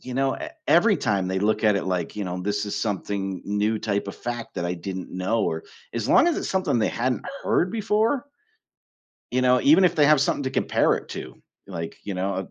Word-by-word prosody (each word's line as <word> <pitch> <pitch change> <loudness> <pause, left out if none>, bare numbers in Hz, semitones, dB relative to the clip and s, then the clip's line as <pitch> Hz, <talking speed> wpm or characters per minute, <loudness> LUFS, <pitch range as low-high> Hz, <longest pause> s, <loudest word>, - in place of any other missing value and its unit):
you 130 - -8
know 135 0 +1
e 310 - -6 0.2
every 195 +5 +5
time 100 -5 0
they 95 0 0
look 105 +2 +1
at 105 -2 +4
it, - - -2
like, 90 -2 -2
you 105 - -2
know 90 0 -4
this 105 +1 -1
is 100 - -3
something 95 -2 -2
new 105 +2 0
type 100 -2 -1
of - - -6
fact 120 -1 -5
that 85 -1 -1
I 90 - -1
didn't 95 +1 -6
know 95 +5 0
or 80 0 -2 0.3
as 115 -2 -2
long 345 - +6
as 335 - 0
it's - - -3
something 185 -10 +1
they - - +2
hadn't 125 +2 -1 0.2
heard 180 - +1
before 225 +5 +1 1.1
you 130 +1 +1
know, 125 0 +4
even 165 +6 +6
if 180 - +3
they 150 -2 +4
have 150 -2 +5
something 140 - 0
to 130 - -1
compare - - +2
it - - -6
to, 65 - -8 0.3
like, 85 -4 -6
you 100 - -4
know 95 +1 -1
ab 95 - -6
105 Hz, 230 wpm, -24 LUFS, 95-135 Hz, 1.1 s, long